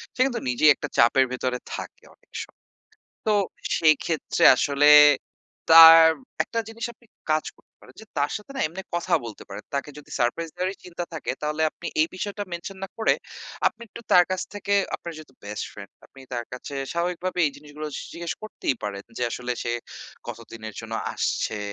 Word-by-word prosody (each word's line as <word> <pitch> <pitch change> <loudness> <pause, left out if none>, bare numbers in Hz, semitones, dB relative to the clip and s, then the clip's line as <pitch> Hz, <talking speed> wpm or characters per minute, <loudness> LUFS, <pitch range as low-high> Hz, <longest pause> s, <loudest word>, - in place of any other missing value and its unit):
সে - - -17
কিন্তু 245 -4 -2
নিজেই 125 +5 +4
একটা - - -5
চাপের 120 +3 +5
ভেতরে 125 0 -2 0.2
থাকে - - -8
অনেক - - -36
সময়। - - -19 0.6
তো 215 - +3 0.5
সেই 155 -1 +6
ক্ষেত্রে 160 -3 0
আসলে 145 +2 +3 0.8
তার 165 0 +11 0.4
১ - - -13
টা 230 - +2
জিনিস 225 +1 -7
আপনি 235 +1 -26 0.2
কাজ 155 0 +2
করতে - - -30
পারেন - - -17
যে, - - -13
তার 145 +1 +1
সাথে 210 +5 -11
না - - -2
এমনি 180 +5 -7
কথা 175 - 0
বলতে 115 -3 -8
পারেন। 100 - -8
তাকে 140 +1 -2
যদি 150 - -14
সারপ্রাইজ 125 +8 0
দেওয়ারই 185 +2 -2
চিন্তা 175 -1 -5
থাকে, 160 - -4
তাহলে 150 +1 -1
আপনি - - -10
এই 155 - +4
বিষয়টা 205 +2 -4
মেনশন 170 +3 -6
না - - -7
করে, 220 - +3 0.5
আপনি 225 - -1
একটু 225 - -10
তার 180 - +8
কাছ 185 -1 -1
থেকে 200 0 -3 0.2
আপনার 170 - -8
যেহেতু 155 -4 -13
বেস্ট 105 +1 -4
ফ্রেন্ড, 100 -1 -11
আপনি 135 - -17
তার 120 -1 -2
কাছে 125 +3 -7 0.2
স্বাভাবিকভাবে 180 +1 -2
এই - - 0
জিনিসগুলো 150 +1 -8
স - - -4
জিজ্ঞেস 170 0 -4
করতেই 215 -10 -2
পারেন, 100 -1 -5
যে - - -2
আসলে 125 +1 -3
সে 120 - -1 0.6
কতদিনের 110 -2 -8
জন্য 115 0 -7 0.2
আসছে, 110 - -1
155 Hz, 185 wpm, -25 LUFS, 125-180 Hz, 0.8 s, তার